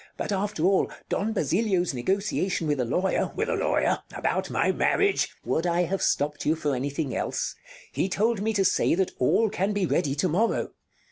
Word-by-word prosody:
But - - -3
after 200 -4 -1
all, 190 0 +3 0.2
Don 215 +3 0
Basilio's 185 -1 +1
negotiation 190 - -1
with 145 -2 0
a 125 - +1
lawyer 180 +11 0
Bartolo - - -16
With 450 +2 -1
a - - +1
lawyer? - - +1 0.2
About - - -1
my - - +2
marriage? 400 -1 +2
Count - - -24
Would 165 +2 0
I 175 +1 +2
have 185 +2 -2
stopped 145 +1 0
you 155 - +2
for 150 -3 -1
anything 140 0 -3
else? - - -2 0.4
He 190 - -1
told 215 +2 +1
me 220 +2 +1
to 195 -2 +2
say - - +3
that 190 0 0
all 210 - +3
can 195 +3 0
be 205 -2 +1
ready 145 -6 0
to 150 +5 +1
morrow. 195 +8 0
185 Hz, 200 wpm, -26 LUFS, 150-205 Hz, 0.4 s, all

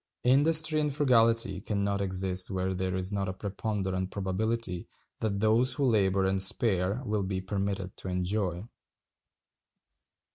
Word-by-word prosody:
Industry 155 +4 +5
and 150 -1 -1
frugality 115 -7 +2
can 100 0 -3
not 100 0 -2
exist 95 -1 +1
where 95 0 -2
there 95 0 -3
is 95 +1 -1
not 100 -2 -2
a - - -4
preponderant 95 -1 -4
probability 100 0 -2 0.3
that 100 -3 -2
those 115 +4 +4
who 140 - -1
labor 100 -5 +1
and 95 0 0
spare 100 +1 +2
will 105 -2 -1
be 95 -1 -3
permitted 95 -1 -4
to - - -6
enjoy. 90 +1 -3
100 Hz, 140 wpm, -28 LUFS, 95-115 Hz, 0.3 s, Industry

